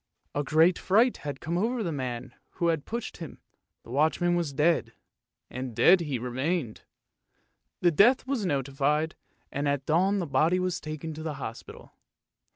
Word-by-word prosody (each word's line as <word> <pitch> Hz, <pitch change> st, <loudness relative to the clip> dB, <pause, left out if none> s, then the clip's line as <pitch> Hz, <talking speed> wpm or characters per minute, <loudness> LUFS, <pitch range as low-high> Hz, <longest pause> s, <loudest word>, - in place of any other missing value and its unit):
A 145 Hz, -, -1 dB
great 160 Hz, +5 st, +4 dB
fright 225 Hz, +6 st, +3 dB
had 145 Hz, -2 st, -6 dB
come 170 Hz, +2 st, -2 dB
over 230 Hz, +3 st, 0 dB
the 170 Hz, -, -2 dB
man 125 Hz, -3 st, -4 dB, 0.2 s
who 170 Hz, -2 st, 0 dB
had 160 Hz, -3 st, -1 dB
pushed 235 Hz, 0 st, -5 dB
him, 165 Hz, -, -8 dB, 0.5 s
the -, -, -12 dB
watchman 160 Hz, +5 st, +2 dB
was 170 Hz, -4 st, -1 dB
dead, 150 Hz, -5 st, +1 dB, 0.5 s
and 125 Hz, -2 st, -6 dB
dead 185 Hz, -, +6 dB
he 150 Hz, -6 st, -2 dB
remained. 125 Hz, +2 st, -2 dB, 1.0 s
The 175 Hz, -, +4 dB
death 230 Hz, -, +5 dB
was 260 Hz, -5 st, -1 dB
notified, 145 Hz, 0 st, 0 dB, 0.4 s
and 145 Hz, +1 st, -2 dB
at 140 Hz, -1 st, -1 dB
dawn 185 Hz, +6 st, +2 dB
the 180 Hz, -, -1 dB
body 155 Hz, +5 st, +2 dB
was 180 Hz, 0 st, -1 dB
taken 155 Hz, +1 st, -6 dB
to 155 Hz, -, -8 dB
the 155 Hz, -2 st, -4 dB
hospital. 115 Hz, -4 st, -9 dB
155 Hz, 165 wpm, -28 LUFS, 140-180 Hz, 1.0 s, dead